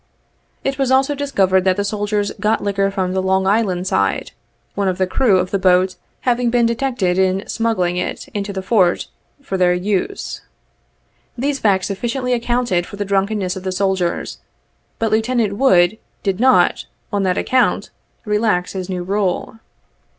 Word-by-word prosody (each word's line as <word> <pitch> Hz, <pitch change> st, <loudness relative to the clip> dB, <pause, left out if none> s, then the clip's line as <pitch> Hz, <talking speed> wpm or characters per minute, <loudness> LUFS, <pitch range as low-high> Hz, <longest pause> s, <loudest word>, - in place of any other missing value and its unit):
It 275 Hz, 0 st, -2 dB
was 270 Hz, -2 st, +1 dB
also 265 Hz, +2 st, +3 dB
discovered 195 Hz, -10 st, +1 dB
that 185 Hz, -1 st, +2 dB
the 205 Hz, -, 0 dB
soldiers 205 Hz, 0 st, -1 dB
got 215 Hz, 0 st, +1 dB
liquor 200 Hz, -1 st, +1 dB
from 190 Hz, -2 st, -2 dB
the 190 Hz, -, 0 dB
Long 190 Hz, 0 st, +1 dB
Island 195 Hz, -3 st, +1 dB
side, -, -, 0 dB, 0.4 s
one 200 Hz, -1 st, -1 dB
of 185 Hz, -1 st, 0 dB
the 190 Hz, -, +2 dB
crew 200 Hz, +1 st, +2 dB
of 180 Hz, 0 st, -1 dB
the 200 Hz, -, 0 dB
boat 185 Hz, 0 st, +3 dB, 0.3 s
having 245 Hz, -1 st, +1 dB
been 240 Hz, 0 st, +3 dB
detected 230 Hz, -6 st, 0 dB
in 190 Hz, +1 st, +1 dB
smuggling 185 Hz, -7 st, 0 dB
it 180 Hz, -, -4 dB
into 205 Hz, -1 st, -4 dB
the 190 Hz, -1 st, -5 dB
Fort 185 Hz, -4 st, +2 dB, 0.3 s
for 195 Hz, -8 st, -3 dB
their 180 Hz, -1 st, +3 dB
use. 200 Hz, -, -2 dB, 1.0 s
These 275 Hz, +3 st, -1 dB
facts 190 Hz, -3 st, +2 dB
sufficiently 245 Hz, +5 st, -2 dB
accounted 240 Hz, -7 st, 0 dB
for -, -, -9 dB
the 205 Hz, 0 st, -3 dB
drunkenness 195 Hz, -1 st, 0 dB
of 190 Hz, -, -6 dB
the 185 Hz, 0 st, -3 dB
soldiers, 190 Hz, -2 st, -1 dB, 0.6 s
but 225 Hz, -1 st, -1 dB
Lieutenant 220 Hz, -2 st, +1 dB
Wood 200 Hz, -5 st, +4 dB, 0.2 s
did 195 Hz, -1 st, -1 dB
not, 260 Hz, +2 st, +3 dB, 0.3 s
on 200 Hz, -, +1 dB
that 185 Hz, -1 st, +1 dB
ac -, -, 0 dB
count, 255 Hz, 0 st, +2 dB, 0.3 s
relax 210 Hz, -4 st, 0 dB
his 190 Hz, -1 st, -5 dB
new 180 Hz, -1 st, -3 dB
rule. 195 Hz, +3 st, -2 dB
200 Hz, 165 wpm, -19 LUFS, 185-230 Hz, 1.0 s, Wood